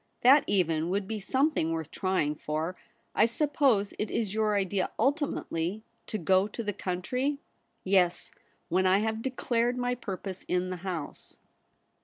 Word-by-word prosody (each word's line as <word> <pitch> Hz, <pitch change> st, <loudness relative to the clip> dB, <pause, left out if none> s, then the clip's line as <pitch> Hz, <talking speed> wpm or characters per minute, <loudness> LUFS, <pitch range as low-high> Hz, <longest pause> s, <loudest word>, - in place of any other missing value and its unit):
That 270 Hz, +4 st, +7 dB
even 165 Hz, -4 st, +1 dB
would 195 Hz, +1 st, -1 dB
be 220 Hz, 0 st, -3 dB
something 260 Hz, -, +1 dB
worth 160 Hz, -1 st, -3 dB
trying 185 Hz, -6 st, 0 dB
for. 155 Hz, +4 st, -3 dB, 0.4 s
I 215 Hz, -, +5 dB
suppose 250 Hz, -5 st, +2 dB
it 210 Hz, -, -1 dB
is 215 Hz, -4 st, -1 dB
your 215 Hz, -1 st, +1 dB
idea 195 Hz, -1 st, 0 dB
ultimately 220 Hz, -, -1 dB, 0.2 s
to 215 Hz, -, -3 dB
go 190 Hz, +2 st, +3 dB
to 230 Hz, +2 st, -6 dB
the 205 Hz, -1 st, -2 dB
country.' 250 Hz, +11 st, -2 dB, 0.3 s
' -, -, -46 dB
Yes, 185 Hz, -2 st, +2 dB, 0.4 s
when 185 Hz, +2 st, +2 dB
I 185 Hz, +1 st, +5 dB
have 220 Hz, +1 st, -1 dB
declared 245 Hz, -1 st, 0 dB
my 245 Hz, 0 st, 0 dB
purpose 195 Hz, -5 st, -6 dB
in 180 Hz, +1 st, 0 dB
the 185 Hz, -, -3 dB
House.' 175 Hz, -4 st, -6 dB
200 Hz, 155 wpm, -29 LUFS, 180-235 Hz, 0.4 s, That